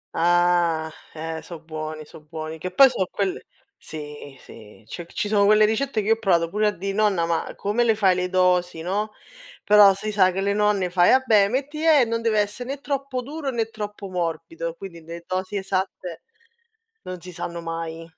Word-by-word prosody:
Ah, 170 -1 +2 0.2
eh 160 +1 -5
so' 170 - -9
buoni, 155 -1 -7
so' 150 - -14
buoni. 155 +1 -7
Che 185 - -4
poi 275 +7 +7
so' 195 -8 -1
quelle 195 -2 -3 0.3
sì, 150 -3 -9
sì, 110 -1 -15
cioè 170 +7 -8
c - - -19
ci - - -2
sono 205 -1 +3
quelle 215 +1 +6
ricette 225 +1 0
che 205 - -6
io - - +7
ho 225 - -5
provato 170 -6 +2
pure 210 +3 +1
a - - +2
dì: 195 +1 -4
"Nonna, 200 -5 +2
ma 165 -1 -1
come 210 +4 0
le 225 -2 +3
fai 195 -3 +3
le 180 0 -2
dosi," 180 -2 +2
no. 205 +4 -2 0.5
Però 205 -1 +7
si 215 +2 -4
sa 185 -3 +4
che 190 - -4
le 200 +1 +1
nonne 205 -3 +1
fai: 175 -1 +4
"Ah 260 0 +4
beh 210 -4 +5
metti 285 +6 -3
e 305 -6 +5
non 230 0 -2
deve 225 -2 +2
essere 210 +5 -5
né 275 0 -4
troppo 275 -3 -3
duro, 290 +1 -5
né 225 -3 -2
troppo 210 -2 -6
morbido," 165 -2 -4
quindi 170 -2 -10
le 170 +1 -9
dosi 185 +2 -3
esatte 190 -3 -3 0.8
non 185 -1 -7
si 180 +1 -10
sanno 170 0 -5
mai. 165 0 -5
185 Hz, 200 wpm, -23 LUFS, 165-215 Hz, 0.8 s, poi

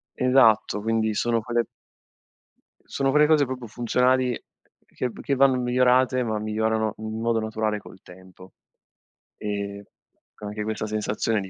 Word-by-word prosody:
Esatto, 115 -5 +3
quindi 110 0 0
sono 115 +1 0
quelle 120 +1 0 1.2
sono 135 -1 -1
quelle 150 +1 +5
cose 150 -2 +4
proprio 125 -2 -6
funzionali 125 +2 +1 0.4
che 125 - -4
v - - -11
che 140 - -1
vanno 135 -1 +4
migliorate, 125 +1 +2
ma 110 -2 -2
migliorano 110 0 -1
in 110 +1 -5
modo 115 -1 +1
naturale 110 -1 -2
col 95 - -15
tempo. 95 +1 -15 0.8
Ehm, 100 -1 -4 0.5
co 105 - -10
anche 105 +1 -4
questa 110 0 -3
sensazione 110 +1 -1
di 95 - -8
110 Hz, 140 wpm, -24 LUFS, 105-125 Hz, 1.2 s, quelle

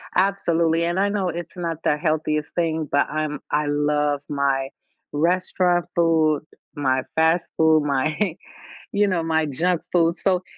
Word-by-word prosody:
Absolutely, 170 -4 +2
and 175 +2 -1
I 200 - +3
know 200 -3 -1
it's 170 +1 -6
not 165 -2 -4
the 150 - +2
healthiest 155 -1 -1
thing, 160 -2 -1
but 145 - +2
I'm 155 -1 -3
I 150 0 +1
love 145 0 0
my 140 -2 0 0.5
restaurant 175 +2 +1
food, 160 -3 +3 0.3
my 130 -3 0
fast 160 +2 +2
food, 160 -1 +4
my, 145 +2 0 0.8
you 205 0 +3
know, 180 -3 0
my 160 -1 +1
junk 165 +5 0
food, 170 -1 +3
so, 185 -1 +1
160 Hz, 150 wpm, -22 LUFS, 150-175 Hz, 0.8 s, food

